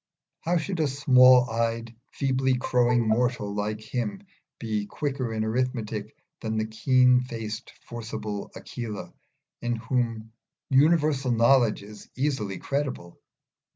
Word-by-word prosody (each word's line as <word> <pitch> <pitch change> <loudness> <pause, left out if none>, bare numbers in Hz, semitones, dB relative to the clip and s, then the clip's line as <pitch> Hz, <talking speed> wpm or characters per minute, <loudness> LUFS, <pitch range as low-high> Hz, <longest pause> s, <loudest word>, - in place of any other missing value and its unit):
How 175 +2 0
should 170 +2 -3
a 155 - +2
small 130 -2 +6
eyed, 115 0 -2 0.2
feebly 130 -1 +1
crowing 120 -1 +2
mortal 115 -2 0
like 105 +1 -2
him 130 - -4 0.3
be 105 -3 -3
quicker 135 -4 -3
in 110 -1 -1
arithmetic 110 -3 -2 0.2
than 110 0 -3
the 110 - 0
keen 125 +3 +4
faced 115 -3 -6 0.2
forcible 110 -3 -5
Aquila, 115 -4 -7 0.5
in 120 0 -1
whom 115 -1 -2 0.4
universal 145 -1 +3
knowledge 115 -2 +3
is 105 0 -12
easily 130 -8 -1
credible? 135 -11 -4
120 Hz, 120 wpm, -26 LUFS, 110-130 Hz, 0.5 s, small